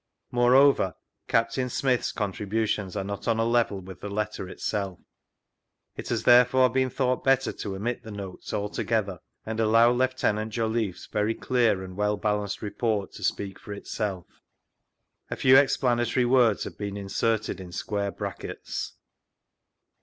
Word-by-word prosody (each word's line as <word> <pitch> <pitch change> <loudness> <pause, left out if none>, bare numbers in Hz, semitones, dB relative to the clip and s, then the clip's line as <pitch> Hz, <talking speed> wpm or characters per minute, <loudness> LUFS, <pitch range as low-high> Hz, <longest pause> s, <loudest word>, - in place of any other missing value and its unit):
Moreover, 125 -3 +4 0.3
Captain 115 +3 +1
Smyth's 125 0 0
contributions 105 -1 -2
are 100 - -1
not 100 0 -6
on 115 -1 +2
a 115 - +1
level 115 -4 +1
with 95 -1 -11
the 105 - -5
letter 100 -2 -3
itself. 100 -2 -3 1.0
It - - -7
has - - -1
tberefore 125 +1 +5
been 130 0 +2
thought 125 0 0
better 135 0 +3
to 100 -2 -5
omit 115 +5 -3
the 110 - -11
Notes 100 -3 -7
altogjether, 105 -2 -1 0.3
and 110 0 -4
allow 115 +2 +5
Lieut. 125 -4 0
Jolliffe's 110 -3 -2
very 105 +2 -1
clear 115 -7 +1
and 90 -1 -9
well 105 +1 0
balanced 105 -1 -2
report 105 0 -1
to - - -10
speak 100 -1 -2
for 105 - -8
itself. 100 -2 -4 1.0
A - - -3
fewiexplana 130 -3 +4
tory 125 - +2
words 120 -4 +4
have - - -8
been 100 -1 -4
inserted 105 +2 -1
in 90 -1 -9
square 100 +3 -2
brackets. - - -5
110 Hz, 145 wpm, -26 LUFS, 100-120 Hz, 1.0 s, tberefore